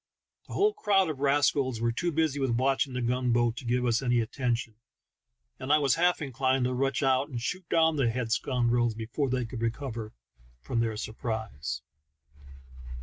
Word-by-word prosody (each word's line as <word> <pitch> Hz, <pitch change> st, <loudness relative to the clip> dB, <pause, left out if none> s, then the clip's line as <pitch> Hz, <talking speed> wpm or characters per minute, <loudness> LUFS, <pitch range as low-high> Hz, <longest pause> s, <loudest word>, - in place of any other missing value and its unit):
The -, -, -9 dB
whole 420 Hz, +2 st, +3 dB
crowd 195 Hz, -, +2 dB
of 140 Hz, -, -8 dB
rascals 140 Hz, -3 st, +2 dB
were 115 Hz, 0 st, +1 dB
too 170 Hz, +9 st, -1 dB
busy 155 Hz, -2 st, 0 dB
with 135 Hz, -1 st, 0 dB
watching 135 Hz, +2 st, +1 dB
the 125 Hz, -1 st, -2 dB
gun 125 Hz, +1 st, 0 dB
boat 120 Hz, -1 st, +2 dB
to 125 Hz, -, -7 dB
give 125 Hz, +1 st, +1 dB
us 120 Hz, 0 st, +2 dB
any 120 Hz, -2 st, +2 dB
atten 120 Hz, +2 st, 0 dB
tion, 115 Hz, -1 st, -7 dB, 0.9 s
and 130 Hz, +2 st, -3 dB
I 150 Hz, -, +7 dB
was 140 Hz, -4 st, +2 dB
half 175 Hz, -1 st, +2 dB
inclined 130 Hz, -1 st, 0 dB
to 125 Hz, -, 0 dB
rush 135 Hz, +2 st, 0 dB
out 135 Hz, +2 st, +2 dB
and 125 Hz, -4 st, -4 dB
shoot 180 Hz, +9 st, -4 dB
down 160 Hz, -1 st, +3 dB
the 130 Hz, -4 st, +2 dB
head 115 Hz, -1 st, -3 dB
scoundrels 120 Hz, -1 st, +1 dB
before 115 Hz, +5 st, -2 dB
they 125 Hz, -1 st, 0 dB
could 115 Hz, 0 st, -7 dB
recover 115 Hz, -2 st, -3 dB, 0.5 s
from 65 Hz, -, -2 dB
their 115 Hz, -2 st, 0 dB
surprise. 110 Hz, -, -4 dB
125 Hz, 185 wpm, -28 LUFS, 115-140 Hz, 0.9 s, I